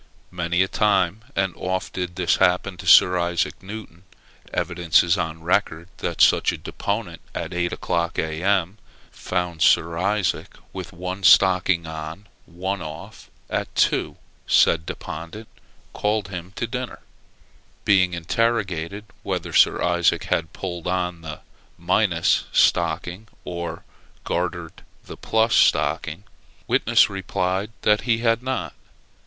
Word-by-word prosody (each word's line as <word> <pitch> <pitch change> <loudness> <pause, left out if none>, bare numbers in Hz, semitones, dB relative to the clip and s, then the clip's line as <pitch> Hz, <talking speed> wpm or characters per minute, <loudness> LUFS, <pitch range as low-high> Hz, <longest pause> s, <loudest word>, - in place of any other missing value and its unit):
Many 85 +1 +1
a - - -2
time 100 0 +1
and 95 -2 0
oft 95 0 -3
did 90 -1 -4
this 90 -2 +1
happen 90 +2 +2
to - - -9
Sir 90 0 +7
Isaac 85 0 -1
Newton. 100 -3 -9 0.5
Evidence 85 -1 +2
is 85 -1 +2
on 80 -2 -4
record, 85 -1 0
that - - -3
such - - +5
a - - -5
deponent 100 -5 -4
at 85 +2 -4
eight 85 0 -1
o'clock, 85 0 -2
A.M., 90 +5 0 0.3
found 90 -3 -3
Sir 85 0 +3
Isaac 100 0 -1 0.2
with - - -7
one 90 +2 -5
stocking 95 -2 +5
on, 80 +4 -7 0.2
one 95 +2 -4
off; 80 -1 -9 0.2
at - - -3
two, - - +1 0.3
said 80 0 +4
deponent 85 +8 -7 0.5
called 105 -1 -1
him 90 -1 -7
to - - -2
dinner. 125 +2 -5 0.8
Being 95 -3 +3
interrogated 100 0 -1 0.2
whether - - -4
Sir - - +4
Isaac 85 -1 +2
had 80 -1 -1
pulled 90 -3 -6
on 90 -2 -2
the 80 -1 -8 0.4
minus - - +2
stocking, 90 +6 +1 0.2
or 85 -1 -5 0.4
gartered 85 -1 -3 0.2
the - - -9
plus 110 0 +1
stocking, 80 +7 +2 0.4
witness - - +4
replied 95 0 -2
that 105 0 +3
he 115 0 +1
had 115 0 +1
not. 125 - -3
90 Hz, 130 wpm, -23 LUFS, 85-100 Hz, 0.8 s, Sir